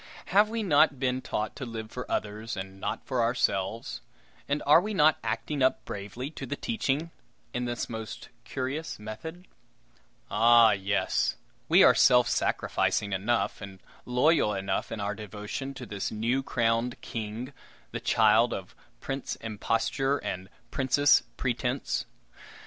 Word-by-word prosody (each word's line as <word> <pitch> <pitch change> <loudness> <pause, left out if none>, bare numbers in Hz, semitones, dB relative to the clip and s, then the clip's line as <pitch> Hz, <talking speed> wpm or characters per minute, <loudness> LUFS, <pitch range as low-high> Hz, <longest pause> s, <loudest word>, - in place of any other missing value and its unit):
Have 205 +2 +6
we 225 0 -2
not 150 -6 +4
been 130 -1 0
taught 105 - -3
to 140 - -5
live 115 -3 -6
for 125 - -6
others 105 +1 -3
and 95 0 -7
not 110 - -3
for 130 -3 0
ourselves, 115 -2 0 0.5
and 145 +1 0
are 150 +4 +7
we 210 +1 -3
not 155 -2 +5
acting 115 +6 -2
up 130 0 +2
bravely 105 +8 -6
to 135 -4 -7
the 145 - -2
teaching 165 - -1 0.4
in 125 0 -2
this 120 0 -3
most 110 -1 -7
curious 135 +5 -4
method? 160 - -8 0.8
Ah! 115 -1 +6
yes, 100 0 0 0.3
we - - +7
are - - +8
self 125 -1 +5
sacrificing 100 -3 0
enough, 110 +6 0
and 100 -2 -9 0.2
loyal 125 -3 +3
enough 95 0 -2
in 110 - -4
our 100 +1 -1
devotion 105 +6 -6
to 125 - -7
this 100 -2 -3
new 115 +5 0
crowned 115 -1 0
king, 115 +4 -5 0.4
the - - -3
child 110 +1 +4
of 95 -1 -8 0.3
Prince 135 0 -4
Imposture 115 +5 -1
and 95 -6 -5 0.2
Princess 145 +1 +4 0.2
Pretense. 125 +1 -1
120 Hz, 145 wpm, -28 LUFS, 105-135 Hz, 0.8 s, are